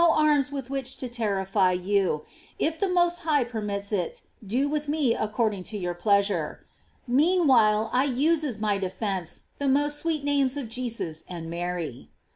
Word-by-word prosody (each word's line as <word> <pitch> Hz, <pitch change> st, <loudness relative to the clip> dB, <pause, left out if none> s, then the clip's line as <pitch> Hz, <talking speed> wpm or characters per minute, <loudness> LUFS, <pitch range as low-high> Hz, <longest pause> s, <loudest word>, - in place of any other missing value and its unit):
rms 305 Hz, -4 st, +4 dB
with 270 Hz, -2 st, -5 dB
which 270 Hz, -2 st, -3 dB
to 255 Hz, -, -4 dB
terrify 195 Hz, -5 st, +1 dB
you; 180 Hz, -3 st, +1 dB, 0.3 s
if 320 Hz, +1 st, -1 dB
the 395 Hz, -, +1 dB
Most 350 Hz, -1 st, +3 dB
High 305 Hz, -5 st, +2 dB
permits 210 Hz, -4 st, -4 dB
it, 180 Hz, -5 st, -2 dB, 0.2 s
do 245 Hz, +8 st, 0 dB
with 295 Hz, 0 st, -2 dB
me 290 Hz, -5 st, +2 dB
according 215 Hz, -2 st, -1 dB
to 215 Hz, -, -4 dB
your 180 Hz, -3 st, -2 dB
pleasure. 200 Hz, -3 st, +1 dB, 0.4 s
Meanwhile 255 Hz, -7 st, +4 dB
I 255 Hz, +2 st, +3 dB
use 295 Hz, +5 st, +2 dB
as 255 Hz, -8 st, -2 dB
my 210 Hz, -2 st, +1 dB
defence 190 Hz, -2 st, -3 dB, 0.2 s
the 285 Hz, -, 0 dB
most 290 Hz, +2 st, +2 dB
sweet 320 Hz, -3 st, -1 dB
names 285 Hz, -2 st, +2 dB
of 260 Hz, -6 st, -4 dB
Jesus 230 Hz, -10 st, -4 dB
and 165 Hz, -2 st, -6 dB
Mary." 170 Hz, -6 st, -4 dB
235 Hz, 160 wpm, -26 LUFS, 195-285 Hz, 0.4 s, rms